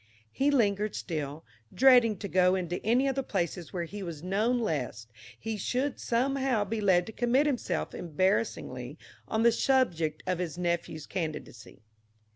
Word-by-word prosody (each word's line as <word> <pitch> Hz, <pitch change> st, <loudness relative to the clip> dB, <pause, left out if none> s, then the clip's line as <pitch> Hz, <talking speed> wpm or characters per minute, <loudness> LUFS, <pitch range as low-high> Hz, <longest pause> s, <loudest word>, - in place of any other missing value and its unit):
He 275 Hz, +2 st, +1 dB
lingered 210 Hz, -6 st, +1 dB
still, 155 Hz, -2 st, -4 dB, 0.3 s
dreading 245 Hz, -5 st, +5 dB
to 200 Hz, -, -5 dB
go 185 Hz, 0 st, +3 dB
into 175 Hz, -1 st, -3 dB
any 245 Hz, +5 st, +3 dB
of 270 Hz, -, +1 dB
the 270 Hz, -, -1 dB
places 175 Hz, -, -3 dB
where 175 Hz, -2 st, -2 dB
he 200 Hz, +5 st, -7 dB
was 170 Hz, -4 st, -6 dB
known 210 Hz, +7 st, +1 dB
lest 130 Hz, -, -3 dB, 0.3 s
he 220 Hz, -1 st, -4 dB
should 255 Hz, +7 st, -1 dB
somehow 260 Hz, -2 st, +1 dB
be 220 Hz, +2 st, -3 dB
led 180 Hz, -3 st, +4 dB
to -, -, -7 dB
commit 245 Hz, +5 st, +2 dB
himself 240 Hz, -, -1 dB
embarrassingly 160 Hz, -, -1 dB, 0.3 s
on 220 Hz, +1 st, 0 dB
the 235 Hz, -, +6 dB
subject 175 Hz, -, +1 dB
of 185 Hz, -1 st, -1 dB
his 175 Hz, -2 st, -3 dB
nephew's 170 Hz, -3 st, -2 dB
candidacy. 155 Hz, -, -6 dB
195 Hz, 155 wpm, -29 LUFS, 170-235 Hz, 0.3 s, the